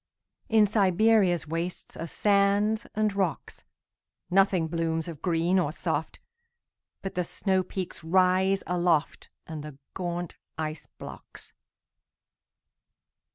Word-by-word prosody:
In 220 -1 +5
Siberia's 200 -2 +3
wastesAre 165 0 -4
sands 205 +3 +2
and 215 -1 +1
rocks. 190 -4 -2 0.7
Nothing 190 -3 +3
blooms 165 0 -1
of 160 -3 -8
green 175 +1 +2
or 150 -5 0
soft, - - -2 0.8
But 195 - -4
the 180 - 0
snowpeaks 185 +1 -1
rise 185 +3 +3
aloftAnd 170 -2 -1
the 150 -2 -9 0.2
gaunt 175 -1 -4 0.2
ice 155 -1 -4
blocks. - - -10
180 Hz, 95 wpm, -27 LUFS, 165-195 Hz, 0.8 s, In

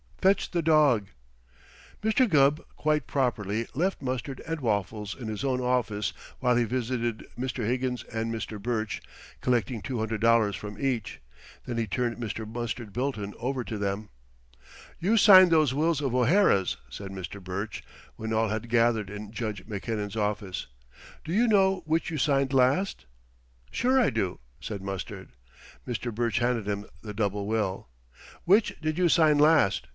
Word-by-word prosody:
Fetch 195 +1 +2
the 175 - +1
dog." 150 -10 +4 1.0
Mr. 220 +3 +3
Gubb, 145 -1 +4
quite 150 -2 0
properly, 115 -5 -1
left 180 +3 -1
Mustard 130 0 -3
and 165 0 -2
Waffles 105 -3 -2
in 120 - -6
his 110 +1 -4
own 130 -2 +1
office 115 -6 0 0.3
while 125 -1 +2
he 120 - +3
visited 120 -1 -2
Mr. 125 -2 -3
Higgins 125 0 -1
and 115 0 -3
Mr. 110 -2 -5
Burch, 110 -1 -2 0.4
collecting 120 -2 0
two 130 -3 -4
hundred 110 -1 -2
dollars 115 -3 +4
from 105 0 -8
each. 120 - -2 0.4
Then 120 -2 -4
he 115 -1 0
turned 120 +4 -1
Mr. 110 -2 -4
Mustard 120 -2 -4
Bilton 120 -6 -2
over 130 +1 -2
to 110 -3 -5
them. 100 +1 -2 0.9
"You 200 +7 +2
signed 185 -4 +8
those 155 -5 +4
wills 155 +1 +1
of 135 -4 -1
O'Hara's," 125 - +3
said 100 -1 -7
Mr. 95 +1 -7
Burch 100 +4 -5 0.3
when 110 0 -5
all 110 0 +2
had 110 +2 -3
gathered 115 -3 +2
in 105 0 -7
Judge 110 -4 -4
Mackinnon's 105 -1 -4
office. 105 -3 -2 0.6
"Do 160 - -6
you 235 +5 +3
know 195 -3 +3
which 160 +2 0
you 155 - -2
signed 135 -1 +2
last?" 135 - +2 0.7
"Sure, 260 +2 +2
I 245 - +4
do," 90 -2 -2 0.2
said 100 -3 -5
Mustard. 95 -1 -6 0.6
Mr. 120 -1 -3
Burch 115 0 0
handed 120 -3 0
him 100 0 -2 0.2
the 105 -1 -7
double 100 -1 -1
will. 105 -6 -1 0.6
"Which 200 +5 +3
did 155 +1 -1
you 180 -2 +4
sign 155 -3 +5
last?" 150 - +4
120 Hz, 160 wpm, -27 LUFS, 105-140 Hz, 1.0 s, signed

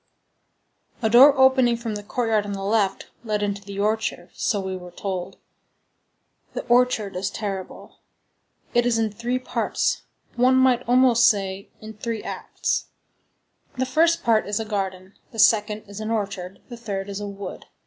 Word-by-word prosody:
_" - - -18
A 220 - +2
door 270 +4 +8
opening 260 -3 +5
from 230 -2 -4
the 205 - -4
courtyard 220 0 0
on 205 0 -5
the 195 0 -5
left 200 -1 0
led 210 -2 -1
into 200 -1 -2
the 200 -1 -8
orchard, 210 -4 -1
so 205 - 0
we 190 -1 -4
were 180 -1 -9
told. 185 -1 -5 1.2
The - - -3
orchard 240 -5 +2
is 190 +2 -1
terrible. 195 -3 -6 0.7
It 240 0 +3
is 235 -2 +2
in 220 -1 0
three 235 +4 -2
parts; 255 - -1 0.3
one 250 +2 +4
might 260 -2 +4
almost 245 -2 +6
say, 195 -2 -2
in 220 0 -9
three 220 +1 -4
acts. - - -2 0.9
The 260 - +1
first 330 +6 +2
part 225 -3 +2
is 205 +1 -1
a 225 - -3
garden, 190 -2 -4 0.2
the 225 - -12
second 215 -1 +3
is 200 +1 -9
an 215 0 -4
orchard, 195 -4 -4
the 240 - -9
third 200 -4 -4
is 200 0 -5
a 205 - -5
wood. 200 0 -8
215 Hz, 170 wpm, -23 LUFS, 200-240 Hz, 1.2 s, door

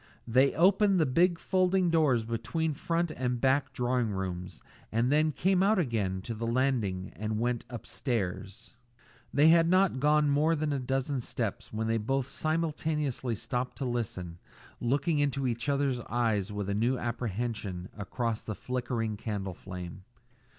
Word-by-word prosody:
They 130 +4 +4
opened 195 +3 +4
the 160 - +4
big 170 +6 +3
folding 185 0 +2
doors 140 -9 +3
between 155 +8 -1
front 170 +3 -1
and 125 -3 -2
back 135 +1 +2
drawing 125 -2 0
rooms 90 -2 -5 0.3
and 115 +4 +1
then 155 +1 +3
came 185 +5 +2
out 205 +3 +4
again 105 - -1
to 115 - -4
the 115 +1 -4
landing 115 -7 0
and 110 0 -2
went 120 0 -1
on 125 - -6
upstairs. 115 -2 -4 0.6
They 150 +3 +5
had 165 0 +5
not 185 -6 +3
gone 150 +2 +4
up 145 - +2
more 155 +3 +3
than 150 -1 -1
a 140 - -1
dozen 135 +2 -1
steps 115 -3 -3
when 110 +1 -2
they 115 0 +1
both 135 +4 -1
simultaneously 155 -6 -1
stopped 125 +4 -3
to 135 - -3
listen, 95 -8 -3 0.4
looking 145 +6 +1
into 140 -1 0
each 120 +2 -1
other's 140 -3 +1
eyes 110 -4 0
with 105 -1 -3
a 100 - 0
new 120 +5 +1
apprehension 115 -5 -3
across 115 +2 -2
the 110 - -5
flickering 120 -3 -2
candle 100 -3 -4
flame. 90 0 -8
125 Hz, 160 wpm, -30 LUFS, 110-150 Hz, 0.6 s, They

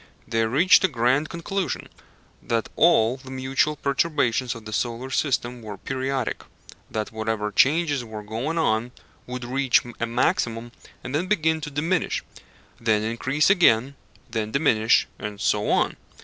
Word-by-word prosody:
They 115 -1 +1
reached 170 - +5
a - - +5
grand 130 +2 +1
conclusion 170 -1 -3 0.5
that 115 -1 -1
all 125 -7 +4
the 130 0 -13
mutual 135 +3 0
perturbations 140 -4 0
of 115 -2 -11
the 110 - -7
solar 120 +3 -2
system 125 -3 -1
were 105 -2 -7
periodic 130 0 -3 0.5
that 110 -1 -3
whatever 110 -1 -2
changes 145 +3 +3
were 110 -2 -8
going 115 +10 -3
on 120 -5 0 0.3
would 125 0 -5
reach 130 +1 +2 0.2
a 115 - -1
maximum 115 0 0 0.3
and 130 - -6
then 165 +5 0
begin 160 -5 +1
to 150 - -5
diminish; 160 +5 -1 0.6
then 110 -2 +1
increase 130 - +1
again, 140 - +4 0.3
then 110 -3 -3
diminish, 110 -5 +3
and 105 -1 -6
so 105 -1 +1
on. - - +1
125 Hz, 145 wpm, -24 LUFS, 115-150 Hz, 0.6 s, reached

